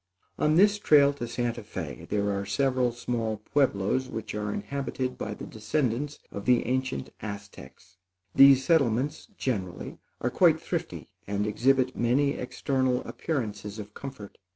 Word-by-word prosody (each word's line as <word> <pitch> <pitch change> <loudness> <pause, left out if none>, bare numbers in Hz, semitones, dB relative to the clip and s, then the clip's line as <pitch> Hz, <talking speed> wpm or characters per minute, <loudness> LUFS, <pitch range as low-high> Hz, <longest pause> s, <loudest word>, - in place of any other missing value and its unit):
On 150 +1 +3
this 205 +3 +5
trail 145 -6 +5
to 120 -4 -5
Santa 120 0 -2
Fé, 105 - -7
there 100 0 +1
are 100 0 -1
several 130 +4 +1
small 115 -2 -2
Pueblos 125 +1 0
which 110 - -5
are 105 0 -2
inhabited 130 +1 -3
by 105 -1 -5
the - - -8
descendants 125 +5 -2
of 100 - -6
the 125 -1 +4
ancient 130 - -2
Aztecs. 100 -4 -9 0.4
These 135 -1 +7
settlements, 140 -2 +2
generally, 95 -9 -3 0.2
are - - -1
quite - - +4
thrifty, - - -4 0.2
and 100 +1 -1
exhibit 130 +4 +2
many 130 +4 +2
external 130 -1 -1
appearances 110 -8 -4
of 105 -1 -8
comfort. 130 -7 -9
125 Hz, 140 wpm, -28 LUFS, 105-135 Hz, 0.4 s, These